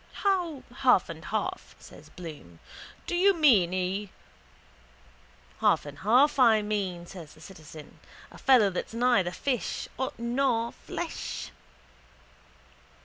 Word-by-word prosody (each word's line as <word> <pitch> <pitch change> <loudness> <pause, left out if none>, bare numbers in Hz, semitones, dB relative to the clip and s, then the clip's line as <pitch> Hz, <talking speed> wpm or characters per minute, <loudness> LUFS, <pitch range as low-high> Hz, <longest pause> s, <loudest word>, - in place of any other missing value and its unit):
—How 355 -8 0
half 250 -10 +4
and 165 0 -8
half? 370 +13 -4
says - - -15
Bloom. 150 - -10 0.5
Do 350 - -2
you 390 +2 +4
mean 235 - +4
he... 185 +2 -2 1.5
—Half - - +3
and 145 -1 -10
half 255 +8 +3
I 225 -4 +5
mean, 195 -5 -3
says 170 -4 -11
the - - -18
citizen. 155 -5 -13 0.3
A - - -13
fellow 245 -7 +5
that's 185 +4 -5
neither 235 -7 +3
fish 245 +6 -3 0.3
nor 235 -1 0
flesh. - - -6
215 Hz, 115 wpm, -28 LUFS, 180-265 Hz, 1.5 s, I